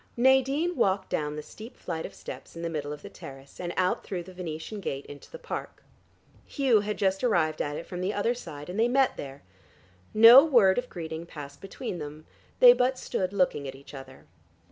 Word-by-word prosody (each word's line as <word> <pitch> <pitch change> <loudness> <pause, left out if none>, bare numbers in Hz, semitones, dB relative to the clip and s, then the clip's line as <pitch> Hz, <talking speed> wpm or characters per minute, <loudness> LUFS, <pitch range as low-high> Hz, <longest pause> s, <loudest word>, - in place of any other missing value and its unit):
Nadine 265 +7 +3
walked 195 -5 0
down 150 0 -1
the 150 - -6
steep 220 +9 -12
flight 160 -2 -5
of - - -16
steps - - -10
in 165 - -7
the 170 - -2
middle 145 -2 -4
of 150 0 -8
the - - -8
terrace, 135 0 -12
and 175 -1 -3
out 185 0 +1
through 180 -3 -5
the 185 +2 -13
Venetian 175 +3 -6
gate 140 -7 -4
into 145 - -12
the - - -9
park. 485 -1 -7 0.6
Hugh 265 -7 +3
had 210 +1 -3
just 195 +1 0
arrived 170 -10 +1
at 145 0 -3
it 165 - -6
from 180 0 -6
the 185 +2 0
other 210 +3 0
side, 150 -11 -9
and 180 +4 -5
they 230 - +4
met 265 +1 +2
there. 135 0 -8 0.7
No 230 +5 +9
word 235 -10 +4
of 250 - -7
greeting 165 -1 -6
passed 140 -3 -10
between 195 -1 -6
them; 150 +1 -8 0.4
they - - +10
but 255 - +1
stood 185 -6 -2
looking 180 -8 0
at 135 - -7
each 140 +2 -14
other. 135 -1 -11
185 Hz, 210 wpm, -27 LUFS, 150-235 Hz, 0.7 s, they